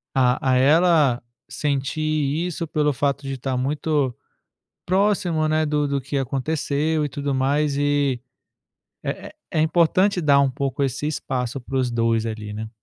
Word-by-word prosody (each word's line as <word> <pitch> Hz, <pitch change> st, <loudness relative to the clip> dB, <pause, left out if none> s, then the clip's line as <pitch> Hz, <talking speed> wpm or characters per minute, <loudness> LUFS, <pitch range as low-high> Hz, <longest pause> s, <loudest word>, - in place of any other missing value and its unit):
A 130 Hz, 0 st, +2 dB
a 130 Hz, -, +4 dB
ela 150 Hz, -2 st, +4 dB, 0.3 s
sentir 140 Hz, +1 st, -2 dB, 0.5 s
isso 165 Hz, -1 st, -4 dB
pelo 150 Hz, -1 st, +1 dB
fato 140 Hz, +2 st, -1 dB
de 135 Hz, -, -3 dB
estar 130 Hz, 0 st, -3 dB
muito 145 Hz, 0 st, 0 dB, 0.7 s
próximo, 185 Hz, -4 st, +1 dB
né, 155 Hz, 0 st, +1 dB
do-do 145 Hz, -1 st, 0 dB
do -, -, -1 dB
que 135 Hz, +2 st, -4 dB
aconteceu 150 Hz, +3 st, -1 dB
e -, -, -1 dB
tudo 140 Hz, -1 st, -3 dB
mais 140 Hz, +2 st, +1 dB
e, 145 Hz, -3 st, +1 dB, 0.8 s
eh, -, -, -5 dB, 0.2 s
é 155 Hz, -, +1 dB
importante 175 Hz, +4 st, +3 dB
dar 140 Hz, -3 st, +4 dB
um 140 Hz, -1 st, +2 dB
pouco 140 Hz, +1 st, -2 dB
esse 135 Hz, +2 st, -1 dB
espaço 130 Hz, -3 st, -3 dB
para 135 Hz, +2 st, -6 dB
os 130 Hz, -2 st, +1 dB
dois 115 Hz, -1 st, +1 dB
ali, 110 Hz, -2 st, -5 dB
né. 110 Hz, +1 st, -5 dB
140 Hz, 155 wpm, -23 LUFS, 130-155 Hz, 0.8 s, a